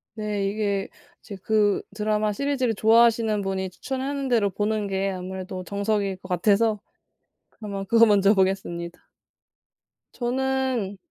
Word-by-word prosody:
네 210 -2 -2
이게 200 -1 -1 0.3
이제 200 -3 -9
그 210 -2 +2
드라마 210 0 0
시리즈를 260 -1 0
좋아하시는 225 -1 +3
분이 190 -1 -2
추천하는 270 +6 -4
대로 220 -5 +2
보는 210 +1 -1
게 195 0 -1
아무래도 185 0 -6
정석일 200 -1 -1
것 185 - -13
같아서. 210 +4 +2 0.7
그러면 200 -3 -6
그거 230 +2 +6
먼저 205 0 +4
보겠습니다. 180 -3 -1 1.2
저는 255 -4 -1
210 Hz, 290 characters per minute, -24 LUFS, 195-225 Hz, 1.2 s, 그거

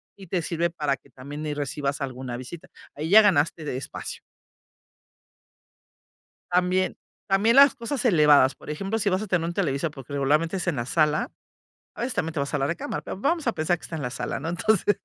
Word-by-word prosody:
y 195 -1 -13
te 175 +1 -1
sirve 170 +1 0
para 150 -5 -1
que 140 - -24
también 140 +4 -8
ahí 150 - -2
recibas 145 0 -2
alguna 130 -2 -4
visita. 130 +7 -9 0.3
Ahí 155 +2 -4
ya 215 +4 +9
ganaste 160 -4 +2
de 130 - -3
espacio. 130 - -6 2.3
También 180 +1 +1 0.3
también 205 +5 +3
las 280 0 +8
cosas 245 +3 -3
elevadas. 150 - +5
Por - - -11
ejemplo, 195 +8 -2
si 200 -2 +1
vas 185 0 +1
a 215 - -4
tener 180 -4 0
un 170 - -3
televisor, 165 -4 -1
porque, 140 -1 -10
regularmente 150 +6 +1
es 185 - -3
en 170 -5 0
la 120 -1 -3
sala, 155 +1 +1 0.6
a - - -9
veces 240 +1 -2
también 165 - -1
te 155 - -2
vas 140 +2 -3
a - - +2
la 135 - +1
recámara, 170 +4 -3
va - - -4
vamos 305 - 0
a 235 - +2
pensar 160 0 0
que - - -29
está - - -7
en 160 - -3
la 130 - -2
sala, 125 - -4
¿no?, 155 - -4
entonces, 205 +3 +2
160 Hz, 210 wpm, -25 LUFS, 145-190 Hz, 2.3 s, ya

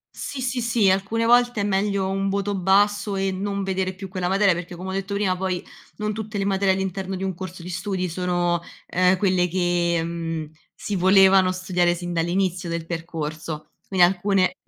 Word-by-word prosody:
Sì, 275 - -5
sì, 245 0 -1
sì. 225 -4 +3
Alcune 200 +4 0
volte 240 -1 +4
è - - 0
meglio 200 -1 0
un 195 +1 -1
voto 200 +1 -1
basso 205 +2 +2
e 195 0 0
non 200 +1 -3
vedere 190 -1 -1
più 190 0 -8
quella 185 -1 -2
materia, 195 0 +4
perché, 175 +1 -6
come 185 +2 -6
ho - - -3
detto 195 +1 -3
prima, 200 -2 +1
poi 185 -1 -3 0.3
non 210 0 -2
tutte 215 0 -5
le 195 - -1
materie 195 -1 +2
all'interno 190 0 -3
di 190 - -5
un 190 -1 -1
corso 185 0 -8
di 180 - -7
studi 185 +1 -2
sono, 175 0 0 0.3
ehm, 180 +1 +3
quelle 185 -2 +2
che, 175 -1 +1
mhmm, 165 -2 -4 0.2
si 205 - -4
volevano 190 0 +6
studiare 180 -1 +1
sin 175 0 -5
dall'inizio 175 +1 0
del 170 -1 -3
percorso. 160 -2 -5 0.2
Quindi 185 -2 +5
alcune 185 +1 +1
190 Hz, 190 wpm, -23 LUFS, 175-200 Hz, 0.3 s, volevano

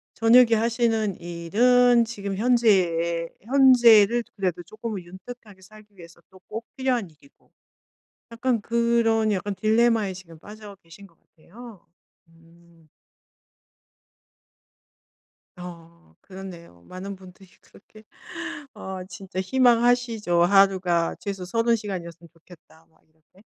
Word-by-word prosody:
저녁에 230 +1 +5
하시는 225 -3 -1
일은 235 +8 +2
지금 200 -4 -6
현재에 180 -8 +1
현재를 240 -3 +5
그래도 180 -3 -3
쪼끔은 215 0 -7
윤택하게 195 +2 -13
살기 210 +1 -18
위해서 170 0 -15
또 190 -1 -19
꼭 225 +2 -7
필요한 255 -7 -1
일이고. 150 -3 -26 0.8
약간 230 -1 -1
그런 230 -1 +1
약간 200 +1 -3
딜레마에 220 0 +1
지금 165 -3 -13
빠져 210 +2 -12
계신 165 +4 -15
것 170 -4 -27
같아요. 210 +4 -16 0.4
음. 165 0 -24 2.7
어 170 - -13
그렇네요. 180 - -12
많은 190 - -8
분들이 185 +1 -16
그렇게 215 +2 -20 0.7
어 190 -1 -7
진짜 185 0 -7
희망하시죠. 235 -5 +2
'하루가 185 -3 +2
최소 195 -3 -6
30 230 +5 +1
시간이었으면 175 -5 -8
좋겠다.' 165 -1 -20
막 160 - -33
이렇게. 160 +5 -27
195 Hz, 250 characters per minute, -24 LUFS, 175-230 Hz, 2.7 s, 저녁에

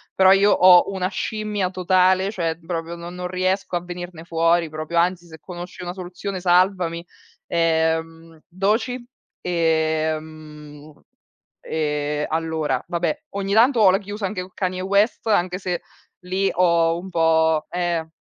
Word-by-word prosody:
però 190 0 +6
io 200 +1 +5
ho 180 0 +6
una 185 -1 -1
scimmia 210 -1 -2
totale, 185 +1 +2
cioè 165 -5 -2
proprio 170 0 -4
non 170 +1 -8
non 180 0 -5
riesco 185 +1 -1
a 175 - -2
venirne 175 -2 -8
fuori 165 0 +1
proprio, 155 +2 -6
anzi 175 0 +1
se 160 -1 -13
conosci 180 0 -9
una 175 - -4
soluzione 185 +1 -6
salvami. 180 -1 +1 0.4
Ehm, 165 0 -1
Doechii, 220 +7 -1 0.4
ehm 155 -3 -2 0.6
ehm, 150 -1 -1
allora, 160 -5 -1
vabbè 170 -3 -2
ogni 200 0 -3
tanto 235 +3 +4
ho 205 - +7
la 185 - +4
chiusa 205 +1 -6
anche 185 -1 -4
con 185 - -14
Kanye 185 -1 -2
West 200 +4 +1
anche 180 -4 +1
se 180 -2 -3 0.4
lì 190 +2 0
ho 170 -2 +2
un 190 +2 -9
po' 160 -2 +2
ehm 175 -2 -2
175 Hz, 140 wpm, -22 LUFS, 160-185 Hz, 0.6 s, ho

